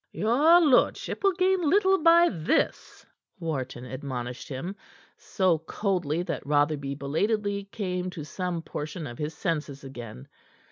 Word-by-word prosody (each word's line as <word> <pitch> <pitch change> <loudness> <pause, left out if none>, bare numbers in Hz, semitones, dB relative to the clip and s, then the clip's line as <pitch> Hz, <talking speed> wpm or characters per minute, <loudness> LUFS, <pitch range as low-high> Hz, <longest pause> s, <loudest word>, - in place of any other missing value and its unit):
"Your 290 - +5
lordship 295 +2 +2
will 390 -1 +4
gain 370 -3 +2
little 385 +1 +4
by 335 +2 +6
this," 165 - -1 0.3
Wharton 135 -7 -4
admonished 125 -1 -6
him, 160 +9 -5 0.4
so 185 -5 +1
coldly 175 -2 -1
that - - -4
Rotherby 145 -1 +1
belatedly 200 +8 -1
came 185 -3 -3
to 170 -4 -7
some 175 +1 -4
portion 155 +2 -5
of 120 -3 -8
his 150 +1 -3
senses 150 -4 -3
again. 120 - -9
170 Hz, 130 wpm, -27 LUFS, 140-215 Hz, 0.4 s, by